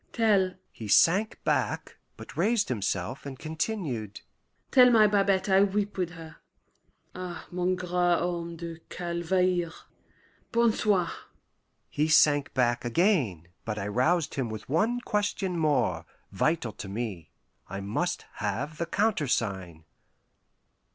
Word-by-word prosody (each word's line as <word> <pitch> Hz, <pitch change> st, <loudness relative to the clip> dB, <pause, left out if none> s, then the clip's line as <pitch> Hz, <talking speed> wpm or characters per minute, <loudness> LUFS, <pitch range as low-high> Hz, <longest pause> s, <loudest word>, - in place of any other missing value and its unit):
Tell"...he 185 Hz, -, 0 dB
sank 190 Hz, -, +4 dB
back, -, -, -1 dB, 0.2 s
but -, -, -11 dB
raised 225 Hz, -2 st, +1 dB
himself, 100 Hz, 0 st, -2 dB
and 135 Hz, -2 st, -7 dB
continued: 155 Hz, -, -4 dB, 0.5 s
"Tell 250 Hz, -2 st, +7 dB
my 225 Hz, -3 st, +6 dB
Babette 195 Hz, -2 st, +2 dB
I 190 Hz, 0 st, +5 dB
weep 205 Hz, +1 st, 0 dB
with 180 Hz, -3 st, -1 dB
her.... 165 Hz, -2 st, -11 dB, 0.8 s
Ah, 180 Hz, -2 st, -7 dB
mon 180 Hz, +1 st, 0 dB
grand 180 Hz, -1 st, -7 dB, 0.3 s
homme 170 Hz, -1 st, -3 dB
de 165 Hz, -1 st, -7 dB
Calvaire 175 Hz, 0 st, 0 dB, 0.8 s
bon 235 Hz, -1 st, +3 dB
soir!" 200 Hz, -6 st, +1 dB, 0.8 s
He 150 Hz, +2 st, 0 dB
sank 150 Hz, -2 st, +4 dB
back 120 Hz, -2 st, +1 dB
again, 120 Hz, -, +1 dB
but 105 Hz, -1 st, -4 dB
I 100 Hz, -1 st, -3 dB
roused 150 Hz, +8 st, +1 dB
him 130 Hz, -4 st, -2 dB
with 110 Hz, -1 st, -7 dB
one 225 Hz, -, +1 dB
question 205 Hz, -5 st, -1 dB
more, 125 Hz, -, +1 dB, 0.2 s
vital 125 Hz, -, 0 dB
to 95 Hz, +2 st, -8 dB
me. 100 Hz, -6 st, -5 dB, 0.4 s
I 95 Hz, +1 st, -5 dB
must 100 Hz, +1 st, -2 dB
have 125 Hz, +10 st, -3 dB
the 170 Hz, -, -1 dB
countersign. 115 Hz, -, -1 dB
165 Hz, 125 wpm, -28 LUFS, 120-190 Hz, 0.8 s, Tell